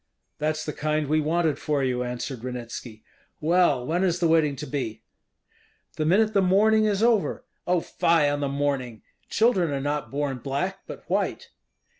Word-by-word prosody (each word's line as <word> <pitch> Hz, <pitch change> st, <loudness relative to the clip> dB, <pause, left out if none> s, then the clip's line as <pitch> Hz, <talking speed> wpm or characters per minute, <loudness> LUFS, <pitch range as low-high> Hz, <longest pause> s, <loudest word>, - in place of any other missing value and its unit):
"That's 155 Hz, +1 st, -1 dB
the 150 Hz, -, -4 dB
kind 155 Hz, 0 st, -1 dB
we 155 Hz, +2 st, +1 dB
wanted 160 Hz, 0 st, 0 dB
for 145 Hz, -2 st, 0 dB
you," 125 Hz, -1 st, 0 dB
answered 125 Hz, +1 st, -4 dB
Ranitski. 120 Hz, -3 st, -7 dB, 0.4 s
"Well, 155 Hz, -6 st, +2 dB
when 175 Hz, +5 st, 0 dB
is 175 Hz, -2 st, +1 dB
the 170 Hz, -, +2 dB
wedding 160 Hz, -3 st, +3 dB
to -, -, -6 dB
be?" 130 Hz, -5 st, -4 dB, 0.9 s
"The 155 Hz, -, -1 dB
minute 215 Hz, +5 st, +3 dB
the 200 Hz, -, +4 dB
mourning 215 Hz, +4 st, +4 dB
is 205 Hz, 0 st, +1 dB
over." 230 Hz, -4 st, +1 dB, 0.2 s
"Oh, 180 Hz, -1 st, +2 dB
fie 165 Hz, -3 st, +2 dB
on 145 Hz, 0 st, 0 dB
the 140 Hz, -1 st, -1 dB
mourning! 135 Hz, -5 st, -2 dB, 0.3 s
Children 210 Hz, -7 st, +2 dB
are 140 Hz, -1 st, -2 dB
not 145 Hz, +1 st, -2 dB
born 140 Hz, -2 st, -2 dB
black, 145 Hz, +10 st, -3 dB
but -, -, -9 dB
white." -, -, -2 dB
150 Hz, 170 wpm, -25 LUFS, 135-180 Hz, 0.9 s, the